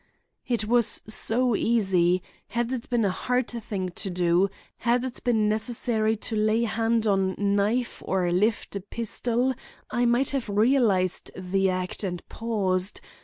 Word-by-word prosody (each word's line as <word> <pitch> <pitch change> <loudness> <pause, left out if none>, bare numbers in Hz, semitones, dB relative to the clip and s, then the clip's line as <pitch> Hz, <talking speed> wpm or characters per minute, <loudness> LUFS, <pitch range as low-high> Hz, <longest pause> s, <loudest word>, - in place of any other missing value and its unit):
"It 235 -3 0
was 235 0 +3
so 235 +2 +1
easy! 185 -6 +2 0.2
Had 240 +1 -2
it 255 -3 -4
been 240 -3 +1
a 195 - +2
hard 250 +5 -1
thing 205 -5 -4
to 185 +2 -4
do; 180 +1 +2 0.3
had 240 +1 +1
it 260 -2 -6
been 225 -4 +2
necessary 220 0 +1
to 225 - -3
lay 215 +2 +2
hand 225 0 0
on 195 -2 +1
knife 205 +4 0
or 185 -2 0
lift 205 +4 0
a 200 - -3
pistol, 235 +4 -1 0.4
I 245 0 +1
might 240 +3 +2
have 270 -6 -2
realized 210 -4 +2
the 190 +1 0
act 185 +2 -3
and 180 -3 -4
paused. 195 -5 -1
215 Hz, 150 wpm, -26 LUFS, 190-235 Hz, 0.4 s, was